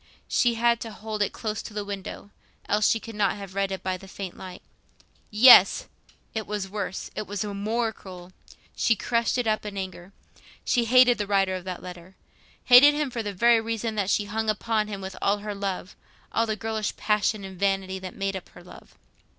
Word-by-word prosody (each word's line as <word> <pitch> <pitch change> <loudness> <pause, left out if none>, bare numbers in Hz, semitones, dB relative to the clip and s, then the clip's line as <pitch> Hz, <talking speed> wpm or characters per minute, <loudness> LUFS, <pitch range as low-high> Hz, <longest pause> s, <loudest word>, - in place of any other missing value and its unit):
She 240 -2 +2
had 235 0 +2
to 230 - -5
hold 215 0 -6
it 205 - +1
close 215 -1 -4
to 210 - -10
the 205 -1 -3
window, 200 0 -7 0.4
else 210 +1 +3
she 225 - +2
could 225 +1 -10
not 205 -3 +1
have 195 -2 -9
read 195 0 -1
it 190 -1 -5
by 185 0 -2
the 195 - -14
faint 190 -1 -7
light. 185 -1 -10 0.7
Yes! 240 +4 +7 0.5
It 220 -1 -4
was 205 -2 -3
worse—it 200 +1 -5
was 205 +1 -3
more 220 +3 -2
cruel. 180 -3 -12 0.4
She 230 - +2
crushed 235 +3 0
it 245 - 0
up 215 -1 +1
again 205 -1 -7
in 195 - -1
anger. 185 0 -11 0.5
She 240 -2 +2
hated 250 0 +5
the 205 - -2
writer 195 -2 +2
of 185 -1 -5
that 185 -1 -6
letter—hated 190 +9 +2
him 295 -3 -1
for 235 - -3
the 205 -2 -4
very 230 +4 +4
reason 225 0 -3
that 200 -3 -1
she 205 - +1
hung 220 +1 -2
upon 215 0 0
him 200 -2 -6
with 190 0 -7
all 200 +1 +2
her 205 0 -5
love—all 200 +3 -4
the 215 - -1
girlish 220 0 -3
passion 210 -1 0
and 190 -2 -9
vanity 195 -1 0
that 185 -1 -8
made 195 -1 -2
up 190 - -8
her - - -15
love. 180 - -15
205 Hz, 200 wpm, -25 LUFS, 190-225 Hz, 0.7 s, Yes